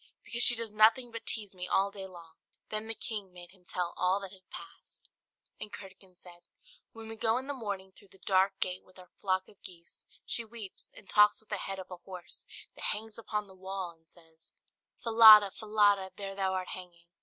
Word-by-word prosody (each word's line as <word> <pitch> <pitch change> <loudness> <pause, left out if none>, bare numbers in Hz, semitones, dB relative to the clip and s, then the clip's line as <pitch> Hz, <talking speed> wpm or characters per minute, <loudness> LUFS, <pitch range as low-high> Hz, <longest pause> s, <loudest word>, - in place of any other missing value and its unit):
"Because 235 - -3
she 240 - +7
does 230 -2 -3
nothing 225 +3 +4
but 230 0 -8
tease 210 -3 -3
me 180 -1 -6
all 195 +2 +2
day 195 -1 -7
long." 170 -3 -13 0.4
Then 215 0 -2
the 225 - -4
king 210 -5 -5
made 175 0 -12
him 185 -1 -19
tell 175 0 -3
all 185 +2 +2
that 195 -2 -7
had 190 -2 -18
passed. 390 - -11 0.5
And 210 - -6
Curdken 190 -2 -12
said, 175 -1 -16 0.4
"When 225 0 -10
we 225 - -7
go 225 +1 +1
in 260 - -4
the 285 - -3
morning 200 -7 -5
through 200 - -19
the 190 - -20
dark 190 0 +2
gate 180 0 0
with 185 - -22
our 180 -1 -15
flock 190 -1 0
of 200 - -21
geese, 170 -3 -11 0.2
she 235 - +1
weeps, 220 -3 -7
and 195 - -14
talks 210 +1 +5
with 220 - -12
the 210 - -1
head 195 0 -4
of 190 0 -9
a 180 - -6
horse 180 0 -9 0.3
that - - -3
hangs 220 +1 0
upon 210 -2 -3
the 195 - -14
wall, 190 -1 -5
and 165 -1 -27
says 160 -2 -14 0.5
"'Falada, 220 -3 +9
Falada, 205 -3 +2
there 195 -1 -5
thou 190 -1 -1
art 185 -1 -3
hanging!'" 175 -2 -9
195 Hz, 215 wpm, -31 LUFS, 185-215 Hz, 0.5 s, Falada